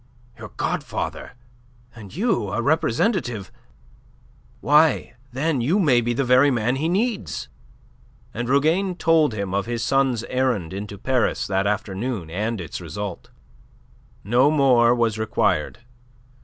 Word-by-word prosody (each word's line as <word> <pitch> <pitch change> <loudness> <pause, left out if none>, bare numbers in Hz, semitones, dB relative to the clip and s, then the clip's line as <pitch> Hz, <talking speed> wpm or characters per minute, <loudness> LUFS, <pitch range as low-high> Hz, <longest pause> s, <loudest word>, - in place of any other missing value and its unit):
"Your 105 -2 -8
godfather! - - -3 0.6
And 105 -5 -12
you 190 - 0
a 100 - -2
representative! 135 - 0 1.1
Why, 150 -3 +3 0.2
then, 140 +1 -1
you 155 - +1
may 140 -11 +3
be 120 +1 -1
the 135 - 0
very 130 +3 +5
man 120 0 0
he 155 +4 -1
needs." 200 - -2 0.8
And 120 +1 -4
Rougane 165 +7 +2
told 160 -8 +2
him 100 -2 -4
of 100 +2 -1
his 120 -1 -3
son's 130 -3 +1
errand 120 -10 -1
into 100 +1 -6
Paris 130 +4 0
that 95 0 0
afternoon 105 -2 -3
and 105 +5 -2
its 85 -4 -6
result. 100 -3 -6 0.9
No 125 +7 +3
more 125 -5 +4
was 115 -2 0
required. 110 - 0
120 Hz, 130 wpm, -22 LUFS, 105-145 Hz, 1.1 s, very